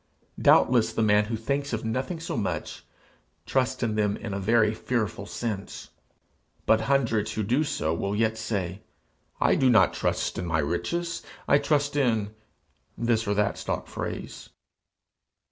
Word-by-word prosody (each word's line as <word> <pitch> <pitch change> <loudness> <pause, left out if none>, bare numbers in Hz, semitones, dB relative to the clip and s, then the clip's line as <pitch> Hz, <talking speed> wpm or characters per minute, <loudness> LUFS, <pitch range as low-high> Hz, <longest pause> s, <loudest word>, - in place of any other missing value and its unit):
Doubtless 120 -3 +5
the 115 - +1
man 105 0 +4
who 115 +2 -3
thinks 140 +5 -2
of 115 0 -2
nothing 130 +9 -2
so 165 - -4
much, 105 -4 -3 0.6
trusts 130 -1 0
in 115 -2 0
them 105 -1 +1
in 105 -3 -6
a 100 - -2
very 110 +2 +3
fearful 110 -3 -2
sense; 105 -5 -5 0.7
but 110 - +4
hundreds 115 -6 +1
who 110 - -1
do 125 +9 +2
so 80 - -1
will 100 +4 -2
yet 110 +1 +1
say, 100 -4 -3 0.6
"I - - +4
do 130 - +3
not 110 -7 +5
trust - - -1
in 90 - -3
my 80 -1 +1
riches; 170 - -2 0.3
I 140 - +5
trust 145 0 +1
in 110 -7 +1 0.3
" - - -46 0.3
this 115 -1 +1
or 100 - +1
that 105 0 0
stock - - -3
phrase.' - - -6
110 Hz, 160 wpm, -26 LUFS, 105-130 Hz, 0.7 s, Doubtless